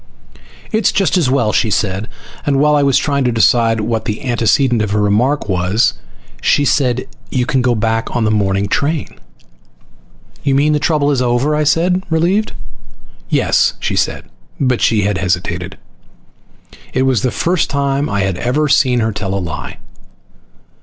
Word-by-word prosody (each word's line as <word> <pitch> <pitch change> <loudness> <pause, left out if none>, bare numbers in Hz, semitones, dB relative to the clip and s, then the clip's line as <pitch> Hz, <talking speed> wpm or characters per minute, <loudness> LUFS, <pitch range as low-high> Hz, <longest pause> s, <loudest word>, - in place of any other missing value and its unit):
"It's 220 0 +2
just 190 -5 +1
as 165 -8 +2
well," 120 -5 +1
she 110 - +1
said. 100 0 -1 0.3
And 140 -1 +1
while 150 +1 +3
I 145 - +3
was 140 -2 +3
trying 140 -2 0
to 125 - +2
decide 115 -1 +2
what 110 0 -2
the 105 - -4
antecedent 120 0 +1
of 105 - -1
her 105 +1 0
remark 110 +8 +1
was 95 +3 +1 0.5
she 145 - +2
said, 130 -2 +1 0.2
"You 125 -2 -1
can 130 0 0
go 125 -1 +1
back 115 +1 -1
on 120 - +1
the 110 - +1
morning 100 -1 0
train." 145 - -2 1.2
"You 140 -1 +1
mean 150 +2 +2
the 150 - +1
trouble 145 0 +1
is 135 -3 0
over?" 125 +5 +1
I 150 0 0
said, 180 +5 +1
relieved. 175 +7 +1 0.8
"Yes," - - +2
she - - -2
said. - - -1 0.3
But 130 -4 0
she 110 -3 +2
had 100 -1 -1
hesitated. 90 0 -2 1.2
It 130 - +1
was 130 -6 +1
the 125 - +1
first 175 +9 0
time 140 +1 -1
I 100 - -1
had 95 -2 -1
ever 145 +5 0
seen 130 -4 +3
her 110 0 0
tell 100 -1 -4
a - - 0
lie. 85 -5 -6
125 Hz, 170 wpm, -16 LUFS, 105-145 Hz, 1.2 s, while